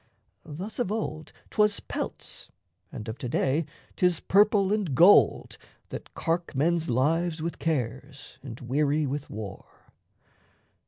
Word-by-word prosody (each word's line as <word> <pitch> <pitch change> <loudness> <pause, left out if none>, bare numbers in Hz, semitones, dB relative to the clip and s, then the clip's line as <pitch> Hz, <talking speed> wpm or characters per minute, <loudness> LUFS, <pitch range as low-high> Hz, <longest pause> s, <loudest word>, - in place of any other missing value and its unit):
Thus 180 +10 -6
of 225 -5 0
old 155 -8 -4 0.2
'Twas 210 -1 +3
pelts, - - -5 0.4
and 105 - -7
of 110 +2 -6
to 125 - -4
day 145 +6 +1 0.3
'tis 180 -3 +2
purple 205 0 +4
and 195 -11 -1
gold 180 +9 +5 0.3
That - - -8
cark 170 -2 -2
men's 165 +3 +1
lives 160 +7 +1
with 165 +2 -4
cares 135 -2 -3
and 125 -3 -8
weary 145 +4 +1
with 145 +1 -4
war. 105 -2 -9
155 Hz, 125 wpm, -27 LUFS, 135-180 Hz, 0.4 s, gold